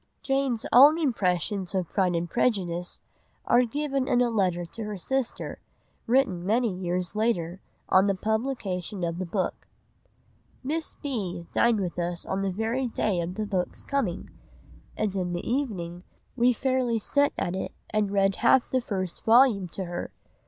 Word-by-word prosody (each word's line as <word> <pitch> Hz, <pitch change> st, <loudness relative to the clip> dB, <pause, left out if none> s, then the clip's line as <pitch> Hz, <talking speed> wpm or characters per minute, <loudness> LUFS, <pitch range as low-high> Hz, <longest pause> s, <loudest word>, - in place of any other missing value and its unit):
Jane's 270 Hz, -4 st, 0 dB
own 285 Hz, +6 st, +8 dB
impressions 195 Hz, -, 0 dB
of 185 Hz, -3 st, 0 dB
Pride 185 Hz, -3 st, +1 dB
and 170 Hz, +1 st, -1 dB
Prejudice 180 Hz, -5 st, -1 dB, 0.4 s
are 245 Hz, +1 st, +4 dB
given 275 Hz, +1 st, -1 dB
in 245 Hz, -, +3 dB
a 245 Hz, -1 st, +2 dB
letter 180 Hz, -5 st, +1 dB
to 220 Hz, +7 st, -7 dB
her 210 Hz, -1 st, -4 dB
sister, 265 Hz, +7 st, -3 dB, 0.5 s
written 225 Hz, -8 st, +2 dB
many 220 Hz, +2 st, +1 dB
years 180 Hz, +1 st, -2 dB
later, 190 Hz, -5 st, 0 dB, 0.3 s
on 190 Hz, +2 st, +5 dB
the 200 Hz, -, +2 dB
publication 210 Hz, -4 st, -2 dB
of 170 Hz, 0 st, -2 dB
the 185 Hz, -, -3 dB
book— 185 Hz, +1 st, -2 dB, 1.0 s
"Miss 310 Hz, +4 st, -3 dB
B. 190 Hz, -11 st, -4 dB
dined 235 Hz, -2 st, +3 dB
with 180 Hz, -2 st, -3 dB
us 175 Hz, 0 st, -2 dB
on 190 Hz, +1 st, -2 dB
the 195 Hz, -, 0 dB
very 225 Hz, +7 st, -1 dB
day 215 Hz, -5 st, 0 dB
of 175 Hz, +2 st, -4 dB
the 215 Hz, -, -2 dB
book's 190 Hz, -3 st, -3 dB
coming, 250 Hz, -11 st, -2 dB, 0.7 s
and 210 Hz, -3 st, -1 dB
in 180 Hz, -2 st, -1 dB
the 175 Hz, -, -4 dB
evening 190 Hz, -10 st, -2 dB, 0.3 s
we 250 Hz, 0 st, +4 dB
fairly 255 Hz, -1 st, 0 dB
set 285 Hz, +6 st, +2 dB
at 175 Hz, -, -1 dB
it 190 Hz, -, -3 dB, 0.2 s
and 215 Hz, -2 st, +1 dB
read 195 Hz, -1 st, +2 dB
half 240 Hz, +1 st, +4 dB
the 260 Hz, -, +2 dB
first 185 Hz, -6 st, -4 dB
vol. 225 Hz, -5 st, +5 dB
to 185 Hz, +2 st, -5 dB
her.... 175 Hz, 0 st, -5 dB
205 Hz, 160 wpm, -27 LUFS, 180-245 Hz, 1.0 s, own